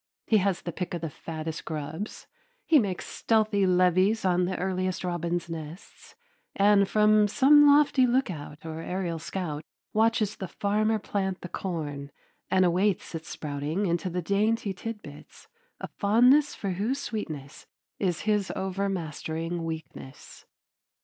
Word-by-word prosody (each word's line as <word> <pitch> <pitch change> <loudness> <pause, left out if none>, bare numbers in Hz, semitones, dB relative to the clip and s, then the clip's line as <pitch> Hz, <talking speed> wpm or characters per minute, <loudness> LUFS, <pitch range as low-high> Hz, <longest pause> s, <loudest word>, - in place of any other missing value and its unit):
He 220 - +4
has 195 -2 0
the 170 - -4
pick 180 +1 -4
of 170 - -5
the 165 -2 -4
fattest 160 +1 -6
grubs; 160 +6 -5 0.4
he 315 -3 +6
makes 195 -6 -2
stealthy 215 -3 +1
levies 185 +4 +3
on 180 -1 +3
the 185 - -2
earliest 185 0 -2
robins' 175 -1 -2
nests; 165 +1 -9 0.4
and 200 -1 +4
from 210 0 +4
some 290 +6 +6
lofty 285 -3 +5
lookout 170 - -2
or 160 0 -5
aerial 175 -2 -3
scout 155 -3 -4 0.3
watches 220 -1 +2
the 190 - -5
farmer 215 +4 0
plant 190 -2 -3
the 180 - -7
corn 145 -7 -4 0.4
and 185 0 +4
awaits 185 +2 +1
its 165 0 -6
sprouting 150 +6 -3
into 170 0 0
the 180 0 -3
dainty 205 +2 +1
tidbits, 190 -7 -9 0.3
a - - -5
fondness 250 +8 +4
for 195 - -3
whose 210 +9 -1
sweetness 155 - -6 0.3
is 180 -4 0
his 210 -2 0
overmastering 175 -3 -3
weakness. 160 -4 -8
185 Hz, 135 wpm, -27 LUFS, 165-210 Hz, 0.4 s, he